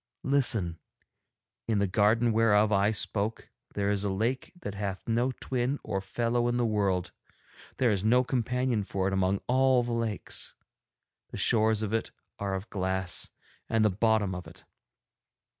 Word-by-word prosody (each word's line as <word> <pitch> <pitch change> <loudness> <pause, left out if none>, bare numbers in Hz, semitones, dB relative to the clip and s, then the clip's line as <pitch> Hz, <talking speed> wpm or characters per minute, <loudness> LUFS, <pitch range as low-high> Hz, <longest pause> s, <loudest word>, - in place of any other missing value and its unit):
Listen. 115 - +2 0.9
In 110 -2 +1
the 100 - +2
garden 110 +4 +3
whereof 110 -1 +3
I 100 0 +3
spoke 110 0 -2 0.2
there 100 0 0
is 100 -1 0
a 100 - 0
lake 115 +7 -1
that 100 - -5
hath 100 -2 -5
no 120 +3 +1
twin 130 +1 -2
or 100 -3 -2
fellow 120 +4 0
in 120 0 0
the 120 - +1
world; 100 -5 0 0.7
there 125 -3 +3
is 100 -2 0
no 125 +4 +4
companion 125 -2 0
for 95 -1 -2
it 95 - -1
among 95 +1 +1
all 130 0 +3
the 120 0 -3
lakes. 115 -3 -2 0.7
The - - -7
shores 110 -1 +3
of 105 0 -3
it 115 - -1 0.3
are 100 -1 -2
of 95 +3 -5
glass, 95 -1 -1 0.4
and 110 -1 +2
the 105 - +3
bottom 110 -1 +1
of 90 -1 -7
it. - - -14
110 Hz, 160 wpm, -29 LUFS, 100-120 Hz, 0.9 s, no